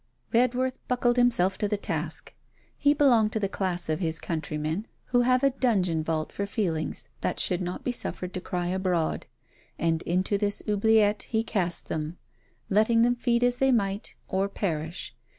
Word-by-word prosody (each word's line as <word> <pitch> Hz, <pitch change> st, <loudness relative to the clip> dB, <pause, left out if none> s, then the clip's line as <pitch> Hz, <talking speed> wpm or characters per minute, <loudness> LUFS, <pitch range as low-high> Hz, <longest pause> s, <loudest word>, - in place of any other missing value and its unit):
Redworth 255 Hz, +2 st, +2 dB
buckled 245 Hz, -1 st, +1 dB
himself 230 Hz, -7 st, +3 dB
to 210 Hz, -, +1 dB
the 210 Hz, 0 st, -1 dB
task. -, -, -3 dB, 0.4 s
He 290 Hz, 0 st, +3 dB
belonged 240 Hz, -7 st, +4 dB
to 220 Hz, -, 0 dB
the 200 Hz, -, 0 dB
class 185 Hz, -2 st, -1 dB
of 155 Hz, +1 st, -1 dB
his 165 Hz, -3 st, 0 dB
countrymen 155 Hz, +4 st, -3 dB, 0.2 s
who 245 Hz, -1 st, +2 dB
have 255 Hz, +2 st, +3 dB
a 275 Hz, -, +5 dB
dungeon 195 Hz, -11 st, +1 dB
vault 155 Hz, -1 st, -2 dB
for 200 Hz, -, -3 dB
feelings 170 Hz, -8 st, -2 dB
that -, -, -1 dB
should 180 Hz, -, +1 dB
not 180 Hz, 0 st, -4 dB
be 250 Hz, -, 0 dB
suffered 185 Hz, -6 st, -2 dB
to 185 Hz, -, -4 dB
cry 180 Hz, -1 st, -3 dB
abroad, 180 Hz, -3 st, -1 dB, 0.5 s
and 165 Hz, 0 st, 0 dB
into 185 Hz, +3 st, 0 dB
this 205 Hz, -1 st, -1 dB
oubliette 210 Hz, 0 st, +3 dB
he 220 Hz, -1 st, +1 dB
cast 185 Hz, -6 st, 0 dB
them, 155 Hz, +2 st, -3 dB, 0.5 s
letting 220 Hz, +3 st, +4 dB
them 245 Hz, +1 st, +4 dB
feed 240 Hz, 0 st, +1 dB
as 245 Hz, 0 st, +3 dB
they 270 Hz, +1 st, +3 dB
might, 200 Hz, -3 st, -1 dB
or 195 Hz, +1 st, 0 dB
perish. 160 Hz, -, -3 dB
200 Hz, 170 wpm, -27 LUFS, 175-240 Hz, 0.5 s, a